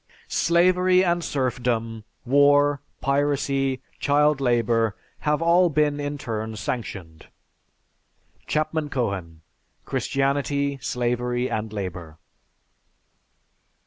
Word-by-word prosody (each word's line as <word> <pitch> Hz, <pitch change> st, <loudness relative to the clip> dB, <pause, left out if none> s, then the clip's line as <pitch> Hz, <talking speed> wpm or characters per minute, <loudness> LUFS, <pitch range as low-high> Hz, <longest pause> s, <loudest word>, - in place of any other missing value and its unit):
Slavery 180 Hz, +2 st, +4 dB
and 175 Hz, -1 st, +1 dB
serfdom, 120 Hz, -5 st, -2 dB, 0.2 s
war, 145 Hz, +2 st, +4 dB, 0.2 s
piracy, 140 Hz, -1 st, 0 dB, 0.2 s
child 145 Hz, 0 st, +2 dB
labor, 115 Hz, -4 st, +1 dB, 0.2 s
have 150 Hz, +2 st, 0 dB
all 175 Hz, +1 st, +4 dB
been 150 Hz, -1 st, +1 dB
in 145 Hz, 0 st, -3 dB
turn 110 Hz, -4 st, -4 dB
sanctioned." 95 Hz, -8 st, -6 dB, 1.2 s
(_Chapman 155 Hz, 0 st, -1 dB
Cohen: 95 Hz, -, -3 dB, 0.4 s
"Christianity, 140 Hz, 0 st, -1 dB
Slavery, 125 Hz, 0 st, -1 dB
and 110 Hz, 0 st, -3 dB
Labor." 90 Hz, -6 st, -6 dB
135 Hz, 80 wpm, -24 LUFS, 115-145 Hz, 1.2 s, Slavery